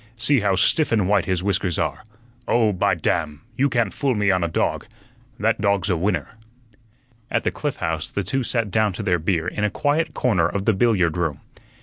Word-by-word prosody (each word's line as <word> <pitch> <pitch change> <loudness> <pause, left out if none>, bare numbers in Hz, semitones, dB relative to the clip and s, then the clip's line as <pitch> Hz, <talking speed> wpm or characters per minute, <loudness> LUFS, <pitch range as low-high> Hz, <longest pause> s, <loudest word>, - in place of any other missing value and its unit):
See 130 +4 +3
how 100 -2 +1
stiff 145 - +3
and 105 -5 +2
white 100 -2 +2
his 90 -1 -1
whiskers 95 -3 0
are. - - -2 0.4
Oh, 110 -3 +2
by 95 0 +1
damn! 80 -3 -2
you 140 +4 +2
can't 120 -6 0
fool 135 -4 0
me 105 -2 +2
on 90 -2 +1
a - - +1
dog. 80 - -1 0.5
That - - +1
dog's 100 -1 +1
a - - +2
winner." 95 +6 -1 1.0
At - - 0
the - - 0
Cliff - - -3
House 80 -1 -3
the 100 - -3
two 130 +9 -1
sat 115 -4 -1
down 110 0 +1
to - - -5
their 90 -1 +1
beer 85 0 -1
in 105 - -3
a 105 - +2
quiet 150 +8 -1
corner 95 -10 +2
of 100 +2 -3
the 110 - +3
billiard 95 -6 +2
room. 80 -5 -2
100 Hz, 210 wpm, -22 LUFS, 90-115 Hz, 1.0 s, See